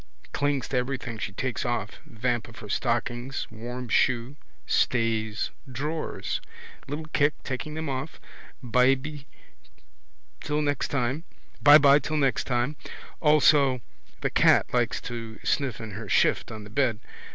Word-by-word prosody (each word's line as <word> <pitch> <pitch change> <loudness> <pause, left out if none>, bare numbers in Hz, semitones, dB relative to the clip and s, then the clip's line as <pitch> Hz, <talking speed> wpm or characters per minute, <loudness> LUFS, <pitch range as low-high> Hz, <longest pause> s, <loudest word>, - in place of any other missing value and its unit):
Clings 140 -2 0
to 130 - 0
everything 125 -3 -3
she 100 - -3
takes 130 +5 -3
off. 120 -4 -2
Vamp 120 0 -1
of 115 - -14
her 105 - -9
stockings. 120 +3 -1
Warm 120 +3 -6
shoe. 120 +3 +1 0.3
Stays. 110 - +1 0.2
Drawers: 150 +5 -3 0.5
little 150 +3 -4
kick, 145 +1 +3
taking 145 +4 -4
them 160 0 -3
off. 135 +3 -4 0.4
Byby 135 +4 +2 1.1
till 150 +1 -1
next 145 -2 0
time. 135 +3 -1 2.0
Also 145 -4 +5 0.4
the - - 0
cat - - +4
likes - - +1
to 115 -2 -6
sniff 140 -4 0
in 110 -2 -7
her 105 +1 -7
shift - - +2
on 110 -1 -7
the 105 - -12
bed. 125 -4 +1
125 Hz, 120 wpm, -27 LUFS, 115-140 Hz, 2.0 s, Also